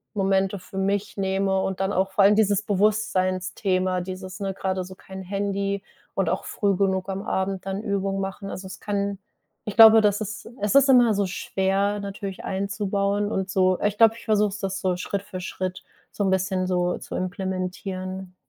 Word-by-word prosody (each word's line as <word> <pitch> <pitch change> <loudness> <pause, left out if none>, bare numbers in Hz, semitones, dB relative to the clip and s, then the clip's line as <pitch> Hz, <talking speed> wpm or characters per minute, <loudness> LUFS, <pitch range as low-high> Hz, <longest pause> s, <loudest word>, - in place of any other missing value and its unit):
Momente 195 0 +1
für 180 +2 -11
mich 200 +2 -1
nehme 195 0 +1
und 190 -1 -3
dann 195 +1 0
auch 190 0 0
vor 195 - +3
allem 205 +1 +6
dieses 205 -2 +3
Bewusstseinsthema, 185 -2 0
dieses, 185 +1 -7
ne, 195 -1 -2
gerade 190 -1 -2
so 185 - -10
kein 190 0 -10
Handy 200 +1 -2 0.3
und - - +1
auch - - -2
früh 200 -2 0
genug 190 0 0
am 195 +1 -3
Abend 190 0 -2
dann 195 +1 -3
Übungen 195 -2 -1
machen. 195 +1 -5
Also, 190 0 -7
es 185 0 -9
kann 200 -1 -2 0.5
ich 210 - -5
glaube, 225 -1 +10
das 205 -1 +2
ist 210 0 -5 0.2
es 210 +4 0
ist 275 0 +6
immer 245 -4 +6
so 200 0 +1
schwer 195 +2 0
natürlich 200 -1 -6
einzubauen 200 +1 -1
und 190 -2 -2
so 185 -1 +2
äh, - - +2
ich 205 0 -3
glaube, 225 0 +6
ich - - -13
versuche 210 -1 +3
es 200 +1 -7
das 195 -2 -3
so 185 -1 0
Schritt 195 +2 -3
für 185 - -7
Schritt 185 0 -4 0.3
so 205 - -2
'n - - +2
bisschen 190 0 0
so 180 -1 0
zu - - -7
implementieren. 185 0 -4
195 Hz, 190 wpm, -24 LUFS, 185-200 Hz, 0.5 s, glaube